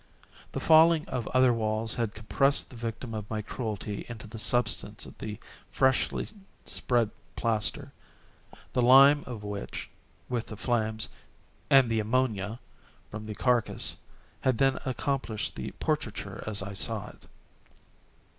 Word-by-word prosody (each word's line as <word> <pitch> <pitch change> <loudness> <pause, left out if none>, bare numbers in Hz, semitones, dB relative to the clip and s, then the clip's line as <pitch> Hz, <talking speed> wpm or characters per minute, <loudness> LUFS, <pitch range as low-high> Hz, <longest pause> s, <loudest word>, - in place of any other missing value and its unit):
The - - -2
falling 160 0 +5
of 120 -3 -3
other 130 -1 +4
walls 110 0 -1
had 115 -3 -2
compressed 135 +8 +1
the - - -11
victim 115 0 -5
of 105 -1 -5
my 110 -1 -3
cruelty 105 -3 -4
into 115 -2 -8
the 110 +1 -7
substance 115 +1 +3
of - - -12
the 105 -1 -5 0.3
freshly 130 -1 +1 0.4
spread 120 -4 +1 0.2
plaster; 115 +5 -1 0.8
the 125 - +2
lime 135 +4 +7
of 115 -4 -7
which, 105 -1 -6 0.4
with 120 -2 -2
the 110 - -8
flames, 110 -2 -1 0.6
and 135 -2 +6
the 115 -1 0
ammonia 110 -1 0 0.5
from 105 0 -6
the 105 -1 -6
carcass, 120 +1 +1 0.4
had 130 -3 +1
then 135 +1 +2
accomplished 130 -4 -2
the - - -5
portraiture - - -3
as 100 -2 -1
I 100 +1 -6
saw 105 +1 -1
it. - - -17
115 Hz, 135 wpm, -28 LUFS, 110-130 Hz, 0.8 s, lime